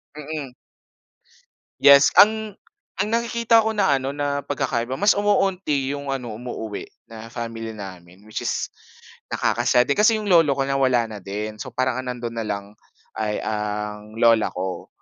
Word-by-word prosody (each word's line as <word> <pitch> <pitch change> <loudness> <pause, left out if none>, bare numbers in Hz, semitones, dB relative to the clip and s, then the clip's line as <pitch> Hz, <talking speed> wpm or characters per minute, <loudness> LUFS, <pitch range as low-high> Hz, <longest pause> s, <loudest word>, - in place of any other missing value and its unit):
mm. 150 -3 -6 1.2
Yes. 140 0 +8
Ang 215 0 +5 0.4
ang 200 +2 -1
nakikita 235 0 +3
ko 220 0 0
na 190 -10 +3
ano, 135 +2 -4
na 145 -1 -1
pagkakaiba, 130 -3 -2
mas 205 +6 +4
umuunti 190 -9 +1
yung 140 0 -5
ano, 125 -4 -6
umuuwi, 110 -4 -6 0.2
na 110 0 -9
family 115 -1 -6
namin 95 -1 -11
which 110 0 -6
is - - -2 0.6
nakaka-sad 125 - +2
din. 140 +9 -1
Kasi 220 +2 +5
'yong 210 -3 -2
lolo 165 -5 +5
ko, 135 - 0
nawala 135 -3 +2
na 105 - -7
din. 105 +3 -5
So, - - -8
parang 130 -1 0
ang 130 - -6
nandoon 120 -2 -5
na 110 - -3
lang 100 -1 -3 0.5
ay 105 -1 -2
ang 105 0 -4
lola 115 -1 +4
ko. 95 +1 -4
130 Hz, 155 wpm, -23 LUFS, 110-155 Hz, 1.2 s, Yes